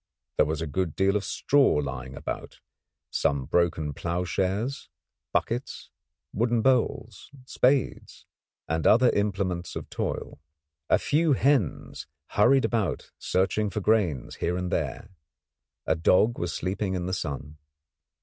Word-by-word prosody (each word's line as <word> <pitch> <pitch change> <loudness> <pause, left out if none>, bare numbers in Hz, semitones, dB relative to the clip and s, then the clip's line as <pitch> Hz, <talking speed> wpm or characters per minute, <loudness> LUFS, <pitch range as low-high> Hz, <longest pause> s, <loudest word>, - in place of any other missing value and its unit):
There 75 - +4
was 80 +1 -2
a - - -2
good 80 +2 -2
deal 95 +1 +2
of 105 - 0
straw 135 +6 +3
lying 65 -2 -3
about, - - -6 0.5
some 70 -2 0
broken 80 -1 +1
ploughshares, 95 - -2 0.4
buckets, 120 +3 -2 0.4
wooden 115 +1 +1
bowls, 120 -5 0 0.2
spades, 130 +1 0 0.4
and 80 0 0
other 120 +2 +6
implements 95 -4 -1
of - - -7
toil. - - -4 0.5
A - - +5
few 155 +1 +2
hens 130 - 0 0.2
hurried 135 +6 +4
about 110 -5 -1
searching 100 +3 0
for 105 - -3
grains 95 - +1
here 90 +1 -1
and 90 -1 -3
there; 100 - -3 0.7
a - - +2
dog 95 +8 +3
was 85 -1 -2
sleeping 95 +1 -2
in 90 -1 -2
the 95 - -3
sun. 75 -2 -5
95 Hz, 130 wpm, -27 LUFS, 80-115 Hz, 0.7 s, other